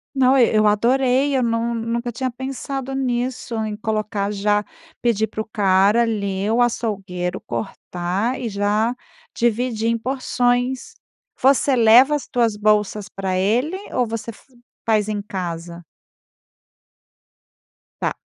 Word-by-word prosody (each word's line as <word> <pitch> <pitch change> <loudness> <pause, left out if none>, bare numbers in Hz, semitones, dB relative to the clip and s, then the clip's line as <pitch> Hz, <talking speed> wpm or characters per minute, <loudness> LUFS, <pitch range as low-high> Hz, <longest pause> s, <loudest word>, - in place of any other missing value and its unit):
Não, 265 0 +4
e 235 -3 +4
eu 215 0 +4
adorei, 260 +5 +2
eu 260 - +2
não, 230 0 0
nunca 235 +1 -2
tinha 255 +3 -2
pensado 270 +1 -5
nisso 250 -2 -2
em 215 -1 -4
colocar 215 -2 -2
já 205 +1 +1 0.4
pedir 225 -3 +2
para 220 0 -5
o - - -6
cara, 200 +2 +4
ali, 200 -3 -1
o 240 +2 +3
açougueiro, 195 -7 -2
cortar 180 - -3
e 240 - -3
já 210 +3 0 0.4
dividir 230 -1 0
em 230 - +1
porções. 250 0 -1 0.5
Você 270 0 +4
leva 240 +5 +6
as 295 - -2
tuas 230 -3 +1
bolsas 210 -1 +1
pra 190 -1 -3
ele 240 - +1 0.2
ou 250 - +1
você 230 +1 -5
f 220 - -10 0.4
faz 215 -2 +2
em 210 -1 -1
casa? 175 -4 -6 2.2
Tá - - -1
225 Hz, 130 wpm, -21 LUFS, 205-245 Hz, 2.2 s, leva